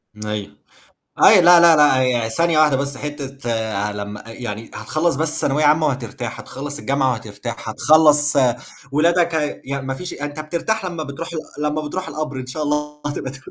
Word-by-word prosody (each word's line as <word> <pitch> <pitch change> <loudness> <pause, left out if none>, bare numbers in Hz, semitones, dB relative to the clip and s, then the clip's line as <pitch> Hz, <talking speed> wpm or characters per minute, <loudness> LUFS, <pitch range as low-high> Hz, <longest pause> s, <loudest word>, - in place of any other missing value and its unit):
أيوه. 105 -1 -5 0.7
أيوه، 205 -4 +8
لا، 175 0 +8
لا، 170 -1 +7
لأ 150 -3 +5
هي 120 -3 +1
ثانية 165 +7 +1
واحدة 150 -3 +4
بس 140 0 -3
حتّة 135 -6 -4
ع 105 +1 -1
لمّا 105 +1 -7
أ - - -10
يعني 115 -1 -6
هتخلّص 155 0 -1
بس 155 +2 0
ثانوية 150 +2 +1
عامة 155 +1 +4
وهترتاح، 125 -2 -4
هتخلّص 145 +2 -7
الجامعة 135 -2 +1
وهترتاح، 110 -4 -6
هتخلّص 150 -1 +5 0.6
ولادك 170 +3 +2
هي 150 -2 -2
يعني 135 0 -4
ما 135 - -2
فيش 180 +7 -7
يعني 145 0 -5
أنت 145 - -9
بترتاح 175 +7 -2
لمّا 170 -3 -4
بتروح 140 +4 -7 0.3
ال 150 - -4
لمّا 150 +1 -1
بتروح 185 +5 -5
القَبر 150 -3 -4
إن 130 - -6
شاء 140 +5 -4
الله 150 0 -2
هتبقى 145 -2 -4
ت 135 - -10
145 Hz, 185 wpm, -20 LUFS, 130-155 Hz, 0.7 s, أيوه